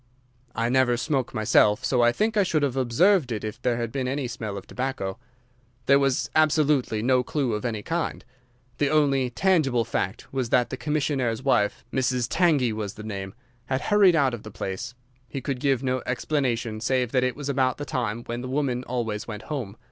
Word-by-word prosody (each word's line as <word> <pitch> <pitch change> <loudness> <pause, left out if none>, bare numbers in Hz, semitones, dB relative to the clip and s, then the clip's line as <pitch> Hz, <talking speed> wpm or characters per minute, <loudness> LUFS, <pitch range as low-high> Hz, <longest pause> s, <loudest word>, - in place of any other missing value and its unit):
"I 115 - 0
never 125 -1 +3
smoke 135 -1 -1
myself, 110 +1 +3
so 130 -2 +2
I 120 0 +5
think 220 - 0
I 210 - +4
should 160 -6 +1
have 135 -3 0
observed 135 - +3
it 110 -3 -3
if 110 -1 -6
there 120 -2 +1
had 115 -1 -3
been 130 -1 -2
any 135 0 -2
smell 110 -4 -5
of 100 - -8
tobacco. 125 -6 -4 0.7
There 140 0 +5
was 135 -2 +1
absolutely 150 -7 +2
no 130 +1 +3
clue 130 -1 -1
of 105 +2 -3
any 110 -3 -2
kind. 165 0 -3 0.5
The 145 - +2
only 140 -4 +2
tangible 135 -5 +2
fact 100 0 -3
was 130 -3 -1
that 125 0 +2
the - - -2
commissionnaire's 135 -4 -1
wife—Mrs. 125 0 0
Tangey 150 -10 +2
was 105 -2 -4
the 110 - -9
name—had 120 +5 -6
hurried 200 -4 +5
out 140 -5 +3
of 120 - -5
the 110 - -9
place. 95 +3 -5 0.3
He 135 - -4
could 135 -1 -3
give 135 -1 +1
no 130 0 0
explanation 125 -5 -1
save 125 -1 0
that 125 -2 +2
it 130 -2 0
was 145 -1 -6
about 130 -2 +1
the 145 - -5
time 120 -5 -2
when 120 +1 -5
the 130 - -6
woman 130 -3 -1
always 115 -4 -3
went 105 -2 -6
home. 115 -7 -5
125 Hz, 195 wpm, -25 LUFS, 115-140 Hz, 0.7 s, I